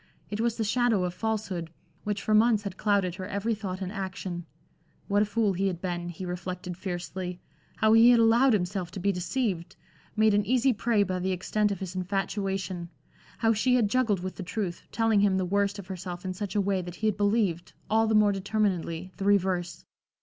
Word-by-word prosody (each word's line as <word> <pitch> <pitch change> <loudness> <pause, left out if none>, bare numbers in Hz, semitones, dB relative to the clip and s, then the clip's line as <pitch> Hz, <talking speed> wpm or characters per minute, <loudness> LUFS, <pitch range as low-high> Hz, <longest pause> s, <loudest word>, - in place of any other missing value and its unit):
It 210 +1 -2
was 235 -1 0
the 225 - 0
shadow 225 -2 +2
of 180 -1 -2
falsehood, 200 -5 -3 0.4
which 210 0 -2
for 215 - +1
months 215 -1 +4
had 200 -3 -5
clouded 200 -3 +1
her 185 -1 -5
every 205 +3 -1
thought 195 -3 -5
and 185 -1 -3
action. 190 -3 -5 0.6
What 205 0 +3
a - - +3
fool 210 -1 +1
he 195 +2 0
had 180 -3 -2
been, 175 -1 -3
he 175 +2 -6
reflected 180 0 -5
fiercely 180 0 -5 0.4
how 220 0 +3
he 225 +2 +8
had 240 -1 +6
allowed 230 +3 +5
himself 185 -2 -1
to 190 - -5
be 200 +2 +2
deceived 185 -2 -2 0.4
made 215 -1 +4
an 205 0 +3
easy 255 +4 +3
prey 215 0 +2
by 185 -1 -2
the 190 +1 -1
extent 205 +3 0
of 195 - -4
his 185 -1 -5
infatuation 190 -1 -2 0.5
how 225 -1 +3
she 250 +4 +2
had 220 -5 +2
juggled 230 -8 +2
with 185 0 -5
the - - -5
truth, 185 -1 -3
telling 225 -2 +2
him 200 -2 +3
the 185 - 0
worst 200 +2 +1
of 200 - -8
herself 180 -1 -6
in 185 - -2
such 195 +1 -5
a 205 - +3
way 195 -1 0
that 175 0 -8
he 220 - -4
had 215 -2 +2
believed, 205 -4 0
all 225 +1 +3
the 220 - +2
more 210 -1 +5
determinedly, 190 -4 -1
the 195 - -4
reverse. 185 -3 +1
200 Hz, 210 wpm, -28 LUFS, 180-215 Hz, 0.6 s, he